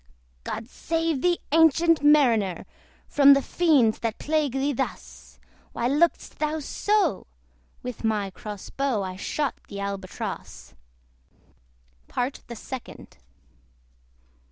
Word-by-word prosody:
"God 225 +1 -5
save 325 0 -2
thee, 350 -1 +2
ancient 325 +1 +4
Mariner! 235 - +4 0.4
From 280 -1 +7
the 275 - +2
fiends, 285 -11 +3
that 230 -1 -2
plague 300 -3 0
thee 275 +2 0
thus! 265 +1 -6 0.4
Why 235 - -1
look'st 300 +6 +1
thou 305 0 0
so?" 380 - 0 0.6
With 250 -2 -6
my 210 -3 0
cross 205 +1 -8
bow 270 -7 -1
I 185 -1 -5
shot 280 +9 -2
the 200 - -7
ALBATROSS. 200 - -6 1.3
PART 250 +3 -3
THE 235 - -7
SECOND. 255 +2 -9
270 Hz, 110 wpm, -25 LUFS, 220-310 Hz, 1.3 s, From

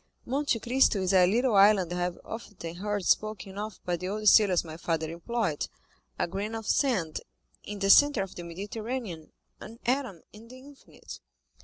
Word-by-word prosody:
"Monte 270 -1 0
Cristo 240 -2 +2
is 185 +1 0
a 180 -1 +6
little 245 +2 +2
island 195 -3 +5
I - - -3
have 175 0 -2
often 185 -7 -8
heard 205 0 -3
spoken 205 -2 0
of 215 0 -6
by 175 -1 -1
the 185 - -5
old 215 +2 -3
sailors 200 -5 +6
my 160 -2 -9
father 160 -1 -2
employed—a 165 - -4
grain 205 +5 -4
of 225 -1 -6
sand 205 - 0 0.4
in 210 - -7
the 195 0 +3
centre 290 -6 +6
of 195 - -9
the 175 - -8
Mediterranean, 200 0 -6 0.3
an 225 +2 -10
atom 245 - -1
in 215 +2 -14
the 255 +2 -12
infinite." 275 +2 -13
205 Hz, 170 wpm, -28 LUFS, 175-230 Hz, 0.4 s, a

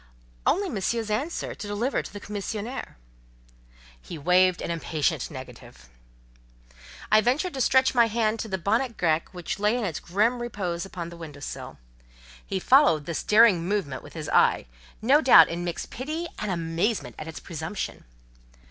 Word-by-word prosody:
"Only 390 +5 +2
Monsieur's 220 - -2
answer 280 +11 -2
to 210 - -8
deliver 215 +6 -1
to - - -10
the 205 - -8
commissionaire." 210 - -5 1.0
He 165 - -8
waved 180 +4 +3
an - - -3
impatient 160 -3 -1
negative. - - -11 1.2
I 215 0 +7
ventured 280 - 0
to 265 - -3
stretch 260 +2 +4
my 235 -2 +5
hand 225 0 0
to 225 - -3
the 190 -3 -2
bonnet 225 +6 0
grec 160 -2 +1
which 180 +1 -5
lay 210 +4 +2
in 200 -9 -2
grim 220 +7 +1
repose 195 -7 -3
on 170 -2 -5
the 170 - -11
window 155 -4 -9
sill. 145 - -7 0.7
He 190 - -3
followed 185 - +4
this 170 0 -3
daring 210 -5 +5
movement 180 -9 -2
with - - -13
his - - -6
eye, - - +3 0.4
no 275 +6 +5
doubt 205 - +8
in 170 +1 -4
mixed 175 -1 -5
pity 310 +7 -4
and 210 - -3
amazement 170 +5 -1
at 155 - -7
its 160 - -7
presumption. 165 +4 -5
205 Hz, 160 wpm, -26 LUFS, 170-235 Hz, 1.2 s, doubt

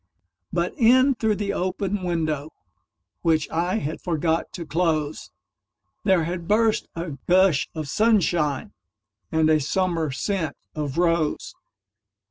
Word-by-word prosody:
But 170 +1 -1
in 255 +3 +5
through 220 -3 0
the 200 -1 -2
open 190 +2 -2
window, 160 -4 -1 0.7
Which 160 -3 +2
I 175 +4 0
had 160 -7 -3
forgot 165 -1 -1
to 170 - -6
close, 155 -2 -1 0.8
There 190 -4 +4
had 170 +1 -4
burst 220 +1 +2
a 165 -5 -5
gush 185 -5 +4
of 155 -1 -3
sunshineAnd 175 - +1 0.6
a 155 -1 +3
summer 165 +1 0
scent 160 +2 -2 0.2
of 150 -2 -4
rose. 170 -3 +1
170 Hz, 115 wpm, -24 LUFS, 155-190 Hz, 0.8 s, in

